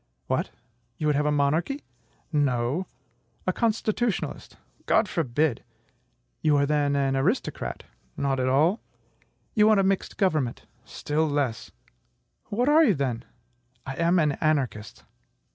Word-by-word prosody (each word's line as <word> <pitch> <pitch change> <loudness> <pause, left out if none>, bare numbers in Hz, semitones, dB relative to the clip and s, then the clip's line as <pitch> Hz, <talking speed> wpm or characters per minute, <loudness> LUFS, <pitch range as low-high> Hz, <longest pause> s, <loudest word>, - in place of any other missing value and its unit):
"What! - - -1 0.5
you 155 - -3
would 150 -1 +2
have 150 +1 +1
a - - +2
monarchy." 155 - 0 0.5
"No." 140 +4 0 0.6
"A 185 - +1
constitutionalist?" 225 0 -1 0.3
"God 215 - +3
forbid!" 145 -5 0 0.8
"You 150 -2 +3
are 140 - +3
then 145 -1 +1
an 135 -1 +1
aristocrat?" 170 - -1 0.3
"Not 135 -1 0
at 130 0 +1
all." 160 - +3 0.7
"You 210 -1 +5
want 215 -2 +5
a - - +3
mixed 190 0 -1
government?" 155 - 0 0.2
"Still 155 +2 -1
less." 140 -6 -1 0.8
"What 240 +5 -1
are 310 +2 +6
you, 220 - +4
then?" 125 -4 -2 0.6
"I 135 - -4
am 170 +2 +3
an 155 -3 +3
anarchist." 135 -9 -1
150 Hz, 130 wpm, -26 LUFS, 135-190 Hz, 0.8 s, are